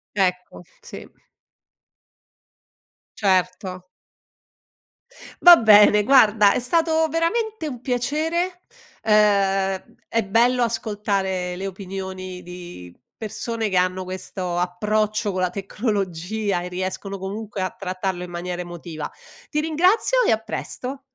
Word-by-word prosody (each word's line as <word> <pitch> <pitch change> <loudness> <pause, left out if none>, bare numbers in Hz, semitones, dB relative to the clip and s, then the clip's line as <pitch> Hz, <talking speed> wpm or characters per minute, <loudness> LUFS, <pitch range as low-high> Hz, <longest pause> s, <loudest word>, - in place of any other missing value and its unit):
Ecco, 180 -2 -1 0.2
sì. - - -10 2.1
Certo. 185 -1 0 1.6
Va 350 -1 +11
bene 210 -1 +6
guarda 215 -4 +5
è - - 0
stato 320 +5 +2
veramente 335 +3 -1
un 250 -4 -7
piacere, 320 +9 -1 0.4
ehm, 195 -3 +2
è 230 -2 0
bello 240 +4 +3
ascoltare 200 -5 -2
le 195 +2 -4
opinioni 185 -1 -7
di 175 - -10 0.2
persone 220 0 -3
che 190 - -2
hanno 185 +1 +1
questo 185 -1 -5
approccio 210 +4 0
con 185 - -2
la 180 - +1
tecnologia 200 -1 -2
e 180 - -5
riescono 190 +2 -4
comunque 200 +1 -6
a 185 -1 -1
trattarlo 185 -1 -4
in 175 - -9
maniera 175 +1 -4
emotiva. 170 -3 -7 0.4
Ti 300 - -1
ringrazio 360 +10 +2
e - - +4
a 220 - +2
presto. 250 +4 -6
200 Hz, 110 wpm, -22 LUFS, 185-230 Hz, 2.1 s, Va